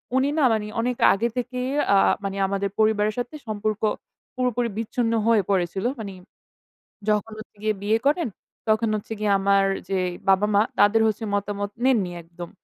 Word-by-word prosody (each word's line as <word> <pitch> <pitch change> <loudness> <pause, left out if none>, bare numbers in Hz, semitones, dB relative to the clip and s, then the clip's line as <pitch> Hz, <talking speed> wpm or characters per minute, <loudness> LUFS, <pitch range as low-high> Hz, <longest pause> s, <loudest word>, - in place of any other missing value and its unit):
উনি 265 +2 +3
না 300 - +3
মানে 210 -1 -1
অনেক 245 +1 -1 0.2
আগে 225 +4 0
থেকেই 250 +1 -2 0.3
আ - - +6 0.3
মানে 195 0 -3
আমাদের 200 0 -1
পরিবারের 215 -1 +2
সাথে 245 +5 -4
সম্পর্ক 215 0 -2 0.5
পুরোপুরি 245 -2 0
বিচ্ছিন্ন 230 +1 -1
হয়ে 220 -4 +4
পড়েছিল। 190 +1 0
মানে 200 -3 -6 1.0
যখন 210 +1 +1
হচ্ছে 215 -1 -12
গিয়ে 215 0 +1
বিয়ে 215 +2 +2
করেন, 305 -1 +2 0.4
তখন 220 +1 +2
হচ্ছে 215 +1 -4
গিয়ে 210 -1 0
আমার 195 0 +3 0.2
যেই 185 -2 0 0.2
বাবা-মা 205 +2 +4 0.2
তাদের 205 +2 +5
হচ্ছে 220 +1 -1
মতামত 205 0 -2
নেননি 210 -9 +2
একদম। 170 +1 -10
215 Hz, 155 wpm, -24 LUFS, 200-230 Hz, 1.0 s, আ